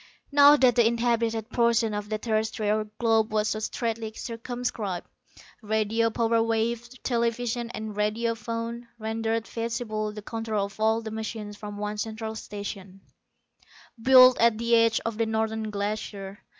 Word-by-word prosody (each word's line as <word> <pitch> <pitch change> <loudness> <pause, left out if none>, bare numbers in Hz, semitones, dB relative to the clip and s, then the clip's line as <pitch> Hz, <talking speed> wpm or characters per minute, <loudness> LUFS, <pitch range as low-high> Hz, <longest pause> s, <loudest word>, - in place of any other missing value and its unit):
Now 285 +1 +8
that 255 -4 +4
the 235 -2 +6
inhabited 230 -1 0
portion 235 -2 +2
of 205 0 -4
the 215 - -1
terrestrial 215 -1 0
globe 225 -2 +2
was 215 0 +1
so 215 - -1
straitly 225 0 -3
circumscribed, 230 -5 -4 0.6
radio 220 +1 +1
power 230 0 +1
waves, 230 +1 -1
television 235 0 -1
and 220 -3 -6
radio 215 +3 0
phone, 230 +1 -5
rendered 225 0 -2
feasible 225 -2 -3
the 210 0 -9
control 220 -2 -2
of 200 +2 -12
all 220 +1 +2
the 220 - -5
machines 220 -1 -5
from 205 -1 -8
one 210 0 -4
central 220 0 -4
station, 200 -3 -7 1.0
built 255 +1 +8
at 230 -1 +4
the 235 +1 +2
edge 230 -1 +4
of 225 -1 -3
the 225 - +2
Northern 220 0 -1
Glacier. 205 -1 -4
225 Hz, 145 wpm, -26 LUFS, 215-230 Hz, 1.0 s, Now